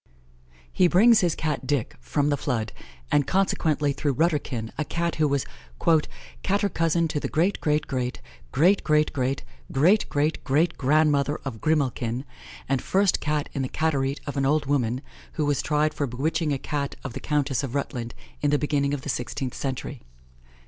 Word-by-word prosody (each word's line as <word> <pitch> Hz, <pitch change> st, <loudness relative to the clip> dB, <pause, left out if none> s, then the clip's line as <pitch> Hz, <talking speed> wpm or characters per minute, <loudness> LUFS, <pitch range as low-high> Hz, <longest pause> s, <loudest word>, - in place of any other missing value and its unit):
He 180 Hz, -, +4 dB
brings 215 Hz, +6 st, +6 dB
his 175 Hz, -3 st, +1 dB
Cat, 150 Hz, -5 st, -2 dB
Dick, 140 Hz, -5 st, -1 dB
from 140 Hz, -, 0 dB
the -, -, +3 dB
Flood, 120 Hz, -6 st, -2 dB, 0.4 s
and 145 Hz, -2 st, +3 dB
consequently 155 Hz, -6 st, +1 dB
through 140 Hz, -1 st, -1 dB
Rutterkin, 145 Hz, -8 st, 0 dB
a 155 Hz, -, -1 dB
Cat 170 Hz, +2 st, -2 dB
who 155 Hz, -, +5 dB
was 140 Hz, -2 st, 0 dB, 1.0 s
"cater 200 Hz, +1 st, +1 dB
cousin 165 Hz, -1 st, +1 dB
to 150 Hz, -, -1 dB
the -, -, -3 dB
great 175 Hz, +6 st, +1 dB
great 150 Hz, 0 st, +1 dB
great 125 Hz, -1 st, -3 dB, 0.3 s
great 180 Hz, +8 st, +4 dB
great 150 Hz, -1 st, +2 dB
great 130 Hz, 0 st, -1 dB, 0.3 s
great 170 Hz, +9 st, +3 dB
great 150 Hz, +2 st, 0 dB
great 160 Hz, +5 st, +2 dB
grandmother 145 Hz, +1 st, +3 dB
of 115 Hz, -5 st, -5 dB
Grimalkin, 130 Hz, -5 st, 0 dB, 0.4 s
and 135 Hz, -2 st, +1 dB
first 195 Hz, 0 st, +2 dB
Cat 150 Hz, -1 st, -1 dB
in 140 Hz, -, -2 dB
the 130 Hz, -, -2 dB
Caterie 140 Hz, -3 st, 0 dB
of 145 Hz, -1 st, -5 dB
an 135 Hz, -, +1 dB
old 150 Hz, 0 st, +2 dB
woman, 130 Hz, -3 st, 0 dB, 0.3 s
who 155 Hz, -, -1 dB
was 145 Hz, -1 st, +1 dB
tried 150 Hz, 0 st, +1 dB
for 145 Hz, -, -1 dB
bewitching 155 Hz, +6 st, -1 dB
a 140 Hz, -, +1 dB
daughter 140 Hz, +1 st, -3 dB
of -, -, -5 dB
the -, -, -5 dB
Countess 140 Hz, -4 st, 0 dB
of 135 Hz, -2 st, -5 dB
Rutland, 125 Hz, -4 st, -3 dB, 0.3 s
in 145 Hz, -, +2 dB
the 145 Hz, -, +3 dB
beginning 145 Hz, -1 st, 0 dB
of 135 Hz, -, -8 dB
the -, -, -7 dB
sixteenth 125 Hz, 0 st, -3 dB
century." 135 Hz, 0 st, -4 dB
145 Hz, 175 wpm, -25 LUFS, 135-155 Hz, 1.0 s, brings